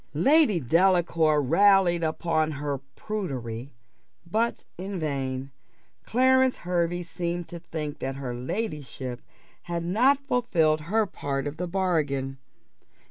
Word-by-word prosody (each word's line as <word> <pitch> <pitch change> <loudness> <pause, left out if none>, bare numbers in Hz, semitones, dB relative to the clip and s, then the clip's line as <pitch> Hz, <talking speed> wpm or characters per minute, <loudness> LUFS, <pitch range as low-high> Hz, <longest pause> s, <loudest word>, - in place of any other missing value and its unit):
Lady 270 - +4
Delacour 165 0 +3
rallied 180 +3 +4
her 160 - +2
upon 160 -1 0
her 140 -1 -3 0.2
prudery, 135 - -4 0.5
but 220 +7 -1
in 190 +1 -5
vain. 135 -3 -3 0.6
Clarence 260 +1 +4
Hervey 175 0 0
seemed 175 0 -4
to 170 - -7
think 155 -3 -5
that 135 0 -3
her 135 -3 -4
ladyship 130 - -4 0.4
had 170 -1 -4
not 245 +10 +4
fulfilled 165 - +2
her 220 +1 +3
part 140 -7 -3
of 145 +1 -4
the 180 +1 -3
bargain. 150 -8 -1
170 Hz, 120 wpm, -26 LUFS, 140-190 Hz, 0.6 s, Lady